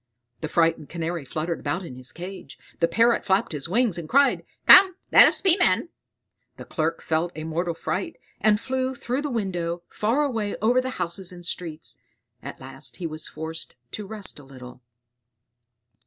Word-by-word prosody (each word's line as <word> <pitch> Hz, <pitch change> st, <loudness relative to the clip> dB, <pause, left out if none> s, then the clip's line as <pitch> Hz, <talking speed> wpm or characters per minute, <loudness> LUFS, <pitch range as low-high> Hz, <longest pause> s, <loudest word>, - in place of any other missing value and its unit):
The 155 Hz, -, -3 dB
frightened 165 Hz, -2 st, +1 dB
Canary 170 Hz, -1 st, -3 dB
fluttered 160 Hz, +5 st, -3 dB
about 170 Hz, +6 st, -3 dB
in 130 Hz, -, -9 dB
his 130 Hz, 0 st, -4 dB
cage; 175 Hz, -7 st, -9 dB, 0.2 s
the 170 Hz, -, +3 dB
Parrot 230 Hz, +4 st, +3 dB
flapped 190 Hz, 0 st, +1 dB
his 150 Hz, 0 st, -4 dB
wings, 215 Hz, -3 st, +1 dB
and 160 Hz, -, -8 dB
cried, 280 Hz, +2 st, +4 dB, 0.2 s
"Come, 375 Hz, -2 st, +9 dB, 0.2 s
let -, -, +9 dB
us -, -, 0 dB
be 375 Hz, -3 st, +6 dB
men!" 230 Hz, -, +2 dB, 0.7 s
The -, -, -9 dB
Clerk 165 Hz, 0 st, -2 dB
felt 165 Hz, +2 st, 0 dB
a 155 Hz, -, -5 dB
mortal 165 Hz, +2 st, -2 dB
fright, 185 Hz, +3 st, -3 dB, 0.2 s
and 210 Hz, 0 st, +3 dB
flew 260 Hz, +1 st, -2 dB
through 250 Hz, +2 st, -2 dB
the 295 Hz, -, -3 dB
window, 175 Hz, -7 st, -2 dB
far 235 Hz, +8 st, +1 dB
away 225 Hz, -7 st, -1 dB
over 240 Hz, +4 st, +3 dB
the 260 Hz, -, -3 dB
houses 180 Hz, +1 st, -3 dB
and 175 Hz, -1 st, -10 dB
streets. 165 Hz, -3 st, -5 dB, 0.4 s
At -, -, -8 dB
last -, -, -9 dB
he 180 Hz, -, -5 dB
was 155 Hz, -1 st, -5 dB
forced 160 Hz, +1 st, -6 dB, 0.2 s
to 210 Hz, -2 st, -6 dB
rest 210 Hz, -6 st, -5 dB
a -, -, -13 dB
little. 130 Hz, -2 st, -12 dB
175 Hz, 175 wpm, -25 LUFS, 160-225 Hz, 0.7 s, Come